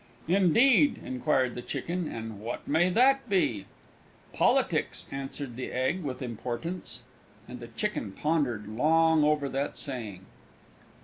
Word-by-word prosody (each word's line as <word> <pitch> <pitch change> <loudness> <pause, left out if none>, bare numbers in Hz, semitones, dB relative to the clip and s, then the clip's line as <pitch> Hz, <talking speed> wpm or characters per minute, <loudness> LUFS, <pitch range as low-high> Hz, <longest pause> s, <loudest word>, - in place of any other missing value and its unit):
"Indeed," 230 - +4
inquired 130 -1 0
the 125 - -6
Chicken, 175 +6 -3
"and 110 -2 -6
what 115 +3 -6
may 160 +5 +3
that 260 +5 +3
be?" 120 - +1 0.7
"Politics!" - - +1
answered 135 -2 -5
the 130 - -5
Egg 130 +9 0
with 135 -4 -5
importance. 125 +9 -5 0.5
And - - -8
the - - -8
Chicken - - -3
pondered 130 -6 -1
long 160 +7 +3
over 150 -1 +2
that 135 +2 -3
saying. 110 -9 -5
145 Hz, 125 wpm, -28 LUFS, 120-175 Hz, 0.7 s, Indeed